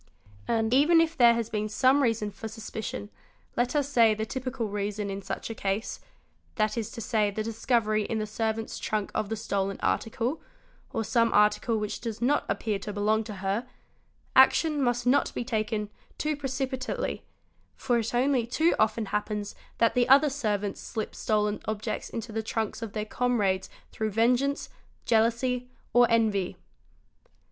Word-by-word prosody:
And 225 Hz, 0 st, +1 dB
even 305 Hz, +5 st, +6 dB
if 330 Hz, 0 st, +2 dB
there 235 Hz, -4 st, +6 dB
has 230 Hz, -1 st, -3 dB
been 215 Hz, 0 st, -1 dB
some 260 Hz, +6 st, +4 dB
reason 225 Hz, -4 st, +1 dB
for 200 Hz, +3 st, -7 dB
suspicion, 220 Hz, -1 st, -6 dB, 0.4 s
let 245 Hz, +4 st, 0 dB
us 290 Hz, -2 st, +2 dB
say 230 Hz, -6 st, +4 dB
the 220 Hz, +1 st, -2 dB
typical 255 Hz, -1 st, -3 dB
reason 205 Hz, 0 st, -3 dB
in 195 Hz, 0 st, -4 dB
such 195 Hz, -, -5 dB
a -, -, -3 dB
case, 200 Hz, +1 st, -2 dB, 0.6 s
that 215 Hz, +1 st, +1 dB
is 225 Hz, -2 st, -3 dB
to 230 Hz, -, -6 dB
say 215 Hz, -2 st, +1 dB
the 215 Hz, +2 st, -3 dB
discovery 220 Hz, -1 st, +1 dB
in 225 Hz, -, -2 dB
the 215 Hz, -, -1 dB
servant's 220 Hz, +1 st, -3 dB
trunk 215 Hz, -2 st, -2 dB
of 215 Hz, -2 st, -1 dB
the 225 Hz, -, -1 dB
stolen 195 Hz, -3 st, -2 dB
article, 235 Hz, +6 st, -1 dB, 0.5 s
or 225 Hz, -, -1 dB
some 230 Hz, +1 st, +2 dB
article 210 Hz, +2 st, +3 dB
which 210 Hz, -1 st, -3 dB
does 230 Hz, -2 st, -4 dB
not 275 Hz, +5 st, +2 dB
appear 210 Hz, -3 st, -1 dB
to 210 Hz, -, -5 dB
belong 210 Hz, +2 st, +1 dB
to 210 Hz, -2 st, -6 dB
her, 205 Hz, +6 st, -1 dB, 0.7 s
action 295 Hz, +3 st, +5 dB
must 245 Hz, -1 st, +1 dB
not 250 Hz, +3 st, +3 dB
be -, -, -1 dB
taken 215 Hz, -3 st, -2 dB, 0.3 s
too 305 Hz, 0 st, -1 dB
precipitately, 270 Hz, -, -3 dB, 0.5 s
for 245 Hz, -2 st, +1 dB
it 230 Hz, +1 st, -2 dB
only 250 Hz, -1 st, +2 dB
too 320 Hz, +8 st, +2 dB
often 220 Hz, +1 st, +2 dB
happens 210 Hz, 0 st, -3 dB, 0.2 s
that 230 Hz, -, +3 dB
other 280 Hz, +2 st, +6 dB
servants 210 Hz, -7 st, -2 dB
slip 220 Hz, -3 st, -4 dB
stolen 210 Hz, -1 st, 0 dB
objects 215 Hz, 0 st, -3 dB
into 230 Hz, 0 st, -5 dB
the 220 Hz, +1 st, -2 dB
trunks; 220 Hz, 0 st, -3 dB
of 225 Hz, -3 st, -5 dB
their 215 Hz, -1 st, -2 dB
comrades 210 Hz, -6 st, 0 dB, 0.2 s
through 220 Hz, 0 st, -2 dB
vengeance, 250 Hz, +6 st, +1 dB, 0.4 s
jealousy, 240 Hz, +2 st, +1 dB, 0.2 s
or 245 Hz, -1 st, +6 dB
envy. 215 Hz, -5 st, +1 dB
225 Hz, 165 wpm, -28 LUFS, 210-245 Hz, 0.7 s, even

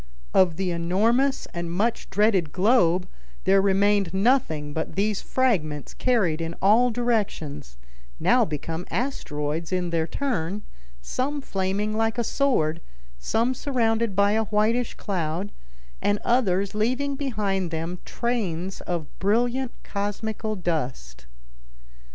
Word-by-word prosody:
Of 180 Hz, -4 st, +4 dB
the 185 Hz, +1 st, -1 dB
enormous 220 Hz, +11 st, +2 dB
and 170 Hz, -1 st, -3 dB
much 220 Hz, +7 st, -1 dB
dreaded 195 Hz, -5 st, +2 dB
globe 185 Hz, -3 st, +3 dB, 0.4 s
there 195 Hz, +1 st, +5 dB
remained 200 Hz, -1 st, +2 dB
nothing 190 Hz, -, +1 dB
but 160 Hz, +1 st, -3 dB
these 205 Hz, +1 st, 0 dB
fragments 160 Hz, -, 0 dB
carried 195 Hz, -11 st, +1 dB
in 165 Hz, +1 st, -4 dB
all 225 Hz, +6 st, +5 dB
directions, 210 Hz, -, -2 dB, 0.4 s
now -, -, +4 dB
become 160 Hz, +3 st, -4 dB
asteroids 160 Hz, -, -2 dB
in 180 Hz, -2 st, -1 dB
their 165 Hz, -1 st, 0 dB
turn, 210 Hz, -, -2 dB, 0.4 s
some 280 Hz, -, -2 dB
flaming 200 Hz, -2 st, -1 dB
like 225 Hz, +1 st, 0 dB
a 235 Hz, -, +1 dB
sword, 170 Hz, -, +1 dB, 0.4 s
some 230 Hz, -, +1 dB
surrounded 230 Hz, -6 st, 0 dB
by 200 Hz, +1 st, +4 dB
a 220 Hz, +1 st, +1 dB
whitish 220 Hz, +4 st, +1 dB
cloud, 180 Hz, +1 st, -2 dB, 0.5 s
and 205 Hz, -, +2 dB
others 200 Hz, -6 st, +2 dB
leaving 255 Hz, +6 st, 0 dB
behind 210 Hz, -9 st, -1 dB
them 165 Hz, +2 st, -4 dB
trains 195 Hz, -7 st, -2 dB
of 170 Hz, -3 st, -2 dB
brilliant 240 Hz, +5 st, +1 dB
cosmical 215 Hz, +1 st, -3 dB
dust. 125 Hz, -, -3 dB
200 Hz, 120 wpm, -25 LUFS, 170-230 Hz, 0.5 s, there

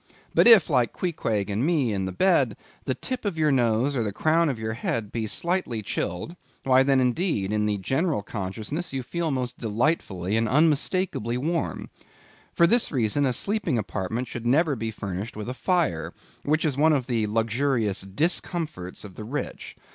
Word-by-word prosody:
But -, -, +5 dB
if, 225 Hz, -8 st, +8 dB
like 125 Hz, -5 st, +1 dB
Queequeg 115 Hz, -, -2 dB
and 105 Hz, +5 st, -1 dB
me 145 Hz, -8 st, +1 dB
in 95 Hz, -1 st, -1 dB
the 95 Hz, -, -3 dB
bed, 180 Hz, -, +2 dB, 0.3 s
the -, -, -1 dB
tip 255 Hz, -1 st, -4 dB
of 200 Hz, -6 st, -2 dB
your 155 Hz, -2 st, +3 dB
nose 125 Hz, +1 st, +2 dB
or 125 Hz, -, +1 dB
the 105 Hz, -2 st, -1 dB
crown 160 Hz, +8 st, +2 dB
of 130 Hz, -, -2 dB
your 110 Hz, 0 st, -3 dB
head 115 Hz, -2 st, -3 dB
be 115 Hz, -2 st, -2 dB
slightly 170 Hz, -, -1 dB
chilled, 90 Hz, -, -3 dB, 0.3 s
why 130 Hz, -1 st, +5 dB
then, 135 Hz, 0 st, +3 dB
indeed, 125 Hz, -, 0 dB
in 105 Hz, 0 st, +1 dB
the 105 Hz, -1 st, 0 dB
general 135 Hz, -, 0 dB
consciousness 110 Hz, -, -5 dB
you 135 Hz, -1 st, -2 dB
feel 170 Hz, +6 st, -2 dB
most 125 Hz, -3 st, -2 dB
delightfully 110 Hz, -, 0 dB
and 115 Hz, -1 st, +1 dB
unmistakably 150 Hz, -, +1 dB
warm. 160 Hz, +5 st, -2 dB, 0.6 s
For 170 Hz, -, +4 dB
this 235 Hz, +7 st, +4 dB
reason 135 Hz, +1 st, +1 dB
a -, -, +2 dB
sleeping 190 Hz, -, 0 dB
apartment 110 Hz, +3 st, -3 dB
should 120 Hz, 0 st, -5 dB
never 150 Hz, +3 st, +3 dB
be 115 Hz, -1 st, -3 dB
furnished 100 Hz, -1 st, -5 dB
with 105 Hz, +1 st, -6 dB
a 125 Hz, -, -3 dB
fire, 165 Hz, -, 0 dB, 0.3 s
which 155 Hz, +2 st, +1 dB
is 150 Hz, -4 st, +1 dB
one 155 Hz, +3 st, +4 dB
of 135 Hz, -4 st, 0 dB
the 115 Hz, -4 st, 0 dB
luxurious 115 Hz, 0 st, 0 dB
discomforts 150 Hz, -, -2 dB
of 100 Hz, -3 st, -10 dB
the 105 Hz, -, -8 dB
rich. 135 Hz, +7 st, -5 dB
125 Hz, 180 wpm, -25 LUFS, 110-160 Hz, 0.6 s, if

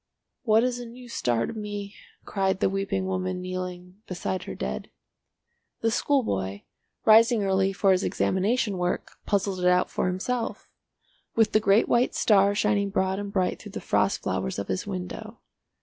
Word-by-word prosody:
"What 225 Hz, -4 st, +4 dB
is 250 Hz, -1 st, 0 dB
a 240 Hz, -, -7 dB
new 245 Hz, +2 st, -12 dB
star 120 Hz, -, 0 dB
to -, -, -5 dB
me?" 205 Hz, -2 st, -5 dB, 0.3 s
cried 190 Hz, -1 st, 0 dB
the 190 Hz, -, +2 dB
weeping 195 Hz, -1 st, -1 dB
woman 185 Hz, -1 st, -2 dB
kneeling 180 Hz, 0 st, -6 dB
beside 185 Hz, 0 st, -3 dB
her -, -, -6 dB
dead. 65 Hz, 0 st, -4 dB, 0.9 s
The 225 Hz, -, +2 dB
schoolboy, 100 Hz, -, 0 dB, 0.4 s
rising 225 Hz, 0 st, +6 dB
early 195 Hz, 0 st, +2 dB
for 195 Hz, 0 st, +2 dB
his 185 Hz, 0 st, +2 dB
examination 200 Hz, +1 st, 0 dB
work, 180 Hz, 0 st, -2 dB, 0.2 s
puzzled 195 Hz, -2 st, 0 dB
it 180 Hz, -, +2 dB
out 180 Hz, 0 st, +3 dB
for -, -, 0 dB
himself—with 225 Hz, +2 st, -3 dB
the 215 Hz, -, +4 dB
great 205 Hz, +1 st, +4 dB
white 240 Hz, +1 st, +2 dB
star 200 Hz, -1 st, +4 dB
shining 205 Hz, -1 st, +1 dB
broad 190 Hz, -1 st, 0 dB
and 200 Hz, -1 st, -5 dB
bright 185 Hz, -2 st, 0 dB
through -, -, -11 dB
the -, -, -4 dB
frost -, -, +1 dB
flowers 65 Hz, -, -2 dB
of 100 Hz, -, -4 dB
his 95 Hz, -1 st, -2 dB
window. 90 Hz, -1 st, -6 dB
195 Hz, 165 wpm, -26 LUFS, 180-215 Hz, 0.9 s, rising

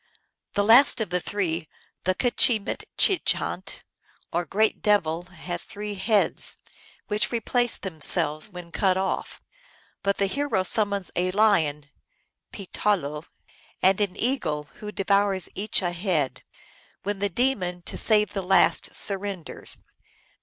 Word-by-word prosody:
" -, -, -58 dB
The 205 Hz, -, +2 dB
last 235 Hz, +7 st, +6 dB
of 215 Hz, -6 st, -3 dB
the 180 Hz, -, +1 dB
three, 175 Hz, -5 st, -3 dB, 0.4 s
the 185 Hz, 0 st, +2 dB
JTche 235 Hz, -2 st, +2 dB
mitche 385 Hz, -, +2 dB
hant, -, -, -5 dB, 0.5 s
or 175 Hz, +1 st, 0 dB
great 215 Hz, +2 st, +1 dB
devil, 175 Hz, -6 st, +1 dB
has 180 Hz, -1 st, -6 dB
three 210 Hz, 0 st, -6 dB
heads, 205 Hz, +1 st, +1 dB, 0.5 s
which 215 Hz, +1 st, 0 dB
replace 240 Hz, +1 st, 0 dB
themselves 155 Hz, -1 st, +1 dB
when 180 Hz, -3 st, -10 dB
cut 185 Hz, 0 st, +1 dB
off; 190 Hz, 0 st, -3 dB, 0.6 s
but 200 Hz, 0 st, 0 dB
the 200 Hz, -, +2 dB
hero 280 Hz, -2 st, 0 dB
summons 200 Hz, -2 st, -1 dB
a 180 Hz, +1 st, +1 dB
lion 155 Hz, -9 st, +2 dB, 0.6 s
(pee 200 Hz, -, -8 dB
tahlo) 150 Hz, -7 st, -1 dB, 0.6 s
and 190 Hz, +2 st, +4 dB
an 200 Hz, -3 st, -1 dB
eagle, 160 Hz, -, -1 dB
who 210 Hz, 0 st, -6 dB
devour 200 Hz, -1 st, +1 dB, 0.2 s
each 205 Hz, 0 st, 0 dB
a 175 Hz, -, 0 dB
head, 170 Hz, -8 st, -1 dB, 0.6 s
when 205 Hz, 0 st, -3 dB
the 205 Hz, 0 st, 0 dB
demon, 185 Hz, -6 st, -1 dB
to -, -, -5 dB
save 210 Hz, -1 st, +4 dB
the 195 Hz, -, -2 dB
last, 190 Hz, +1 st, +2 dB
surrenders. 195 Hz, -4 st, -1 dB
195 Hz, 135 wpm, -25 LUFS, 175-210 Hz, 0.6 s, last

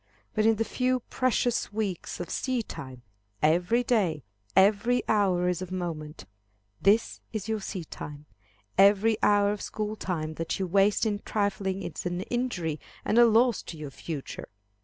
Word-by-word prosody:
But 215 Hz, +1 st, +2 dB
in 225 Hz, -, +5 dB
the 225 Hz, +1 st, -1 dB
few 255 Hz, +1 st, 0 dB
precious 250 Hz, -3 st, +1 dB
weeks 205 Hz, -5 st, -3 dB
of 175 Hz, -, -5 dB
seedtime, 140 Hz, -, -3 dB, 0.4 s
every 180 Hz, +10 st, +3 dB
day, 185 Hz, -, +1 dB, 0.3 s
every 205 Hz, +6 st, +4 dB
hour 190 Hz, -4 st, +2 dB
is 180 Hz, 0 st, 0 dB
of 185 Hz, -1 st, -6 dB
moment. 160 Hz, -, -5 dB, 0.6 s
This 210 Hz, +4 st, +3 dB
is 215 Hz, -2 st, -4 dB
your 220 Hz, -1 st, -1 dB
seedtime. 150 Hz, -6 st, -7 dB, 0.5 s
Every 205 Hz, +3 st, +6 dB
hour 205 Hz, 0 st, +4 dB
of 210 Hz, -, -4 dB
school 215 Hz, 0 st, -3 dB
time 160 Hz, -6 st, -3 dB
that 165 Hz, -, -2 dB
you 190 Hz, -, -1 dB
waste 195 Hz, +4 st, +3 dB
in 205 Hz, -2 st, 0 dB
trifling 195 Hz, -2 st, -1 dB
is -, -, -4 dB
an 175 Hz, 0 st, -2 dB
injury 190 Hz, -10 st, -2 dB, 0.3 s
and 230 Hz, -, +3 dB
a 240 Hz, -, +8 dB
loss 230 Hz, 0 st, +4 dB
to 165 Hz, -, -9 dB
your 150 Hz, -2 st, -7 dB
future. 145 Hz, +1 st, -6 dB
200 Hz, 155 wpm, -28 LUFS, 175-220 Hz, 0.6 s, a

